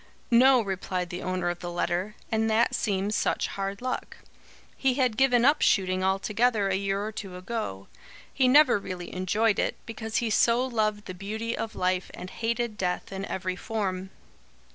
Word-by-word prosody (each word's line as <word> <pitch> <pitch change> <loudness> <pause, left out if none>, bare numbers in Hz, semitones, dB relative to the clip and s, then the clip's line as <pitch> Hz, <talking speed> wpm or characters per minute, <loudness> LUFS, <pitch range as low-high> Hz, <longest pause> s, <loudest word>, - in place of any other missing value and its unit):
"No," 255 +1 +6
replied 185 -2 -3
the 175 - -5
owner 185 -1 -2
of 175 - -7
the 175 - -5
letter, 180 +4 -1 0.2
"and 220 0 +1
that 220 +2 +3
seems 200 0 0
such - - 0
hard 195 +3 -4
luck. 255 - -4 0.6
He 265 -2 +1
had 255 -5 +1
given 250 -2 +4
up 290 +2 +4
shooting 185 -2 +2
altogether 205 +3 +1
a 195 - 0
year 195 +1 -1
or 215 - -4
two 195 -4 -7
ago. 185 - -5 0.5
He 260 - +3
never 265 -4 +6
really 180 -2 -7
enjoyed 205 +4 +1
it, - - 0
because 225 -1 -6
he 230 -2 +1
so 235 +4 +3
loved 215 -4 -1
the 185 - -6
beauty 220 +5 -4
of 225 - -5
life 185 0 0
and 185 - -8
hated 230 -1 -2
death 180 +1 -2
in 195 0 -4
every 185 -1 -3
form. 190 -2 -3
205 Hz, 175 wpm, -27 LUFS, 185-230 Hz, 0.6 s, No